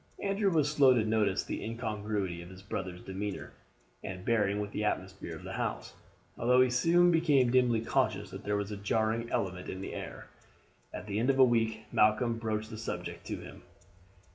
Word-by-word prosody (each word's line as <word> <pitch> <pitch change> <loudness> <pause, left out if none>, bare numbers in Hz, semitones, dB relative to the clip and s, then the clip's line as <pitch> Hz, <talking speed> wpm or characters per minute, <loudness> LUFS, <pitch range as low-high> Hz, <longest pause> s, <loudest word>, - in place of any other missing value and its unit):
Andrew 200 0 +1
was 150 -3 +2
slow 135 -4 +6
to 110 -3 +2
notice 110 -3 +1
the - - -4
incongruity 105 -6 -3
of 85 - -10
his 95 +1 -12
brother's 95 -3 -5
demeanour 95 +1 -5 0.5
and 90 -1 -6
bearing 105 -3 +2
with 105 0 -3
the 105 - -2
atmosphere 95 -3 -3
of - - -11
the - - -6
house, - - -3 0.5
although 125 +2 +4
he 130 -1 +4
soon 170 +8 +4
became 145 -7 +4
dimly 125 -3 +3
conscious 110 -5 0
that 95 +2 -8
there 105 0 0
was 100 0 -3
a 105 - -4
jarring 110 +3 0
element 90 -2 -2
in 95 - -5
the 95 - -6
air. - - -7 0.7
At - - -7
the 105 0 -2
end 120 +4 +1
of 135 - +3
a 135 - +8
week 115 -3 +2
Malcolm 115 +2 +3
broached 110 0 -2
the 110 - -6
subject 115 - -5
to - - -2
him. - - -11
110 Hz, 190 wpm, -31 LUFS, 100-125 Hz, 0.7 s, a